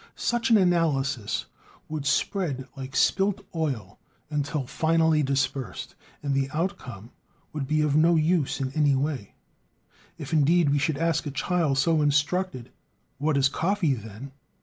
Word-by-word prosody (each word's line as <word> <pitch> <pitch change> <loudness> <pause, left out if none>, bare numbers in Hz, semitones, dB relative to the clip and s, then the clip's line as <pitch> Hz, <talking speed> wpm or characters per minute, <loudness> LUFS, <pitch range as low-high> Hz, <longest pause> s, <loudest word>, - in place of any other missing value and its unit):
Such 240 -1 0
an 225 - +6
analysis 145 - +1 0.4
would 150 -2 -4
spread 140 -3 -1
like 135 -1 -8
spilt 200 +4 +2
oil 130 - -3 0.3
until 145 -1 -2
finally 160 +2 +2
dispersed, 135 -3 -2 0.3
and 140 -1 0
the 135 0 0
outcome 130 - -4 0.4
would 145 -3 -3
be 155 +1 +1
of 150 -2 +1
no 165 +2 +5
use 160 -2 +1
in 130 -1 -2
any 145 -1 +2
way. 135 -6 -3 0.8
If, 150 +2 -7
indeed, 155 +1 +4
we 145 - +2
should 140 +1 0
ask 165 -1 0
a - - -1
child 145 +1 0
so 155 +3 +3
instructed: 145 -1 0 0.5
"What 150 0 +1
is 135 -1 +4
coffee, 170 +1 0
then?" 110 +3 -8
145 Hz, 145 wpm, -26 LUFS, 135-165 Hz, 0.8 s, an